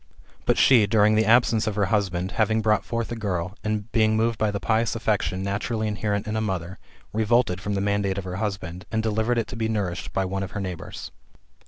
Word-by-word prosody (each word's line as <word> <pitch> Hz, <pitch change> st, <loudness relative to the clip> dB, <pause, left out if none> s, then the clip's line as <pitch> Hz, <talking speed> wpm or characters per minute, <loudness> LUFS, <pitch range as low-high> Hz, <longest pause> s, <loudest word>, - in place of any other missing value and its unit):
But -, -, +3 dB
she, 120 Hz, -6 st, +6 dB
during 105 Hz, +1 st, +4 dB
the 110 Hz, 0 st, +3 dB
absence 115 Hz, -1 st, +4 dB
of 105 Hz, -, -1 dB
her 105 Hz, -2 st, +2 dB
husband, 95 Hz, -3 st, 0 dB
having 110 Hz, 0 st, +1 dB
brought 105 Hz, -2 st, +2 dB
forth 115 Hz, -1 st, -3 dB
a -, -, -2 dB
girl, 95 Hz, -4 st, -3 dB
and, 110 Hz, +1 st, -2 dB
being 110 Hz, -1 st, +3 dB
moved 115 Hz, 0 st, +1 dB
by 110 Hz, -, +2 dB
the 100 Hz, -1 st, -2 dB
pious 115 Hz, +2 st, +1 dB
affection 95 Hz, -5 st, -1 dB
naturally 110 Hz, +3 st, -2 dB
inherent 105 Hz, 0 st, -1 dB
in 110 Hz, 0 st, -3 dB
a 110 Hz, -, 0 dB
mother, 95 Hz, -3 st, -3 dB, 0.3 s
revolted 110 Hz, -3 st, +2 dB
from 100 Hz, +1 st, -2 dB
the 100 Hz, -, 0 dB
mandate 100 Hz, -1 st, 0 dB
of 100 Hz, -, -3 dB
her 90 Hz, 0 st, -5 dB
husband, 95 Hz, -3 st, -4 dB
and 110 Hz, 0 st, 0 dB
delivered 110 Hz, +2 st, 0 dB
it 115 Hz, -, +1 dB
to -, -, -6 dB
be 110 Hz, -1 st, -1 dB
nourished 95 Hz, -5 st, -2 dB
by 95 Hz, -, 0 dB
one 95 Hz, +1 st, -3 dB
of 95 Hz, -1 st, -5 dB
her -, -, -3 dB
neighbours. 90 Hz, -3 st, -6 dB
105 Hz, 220 wpm, -25 LUFS, 95-110 Hz, 0.3 s, she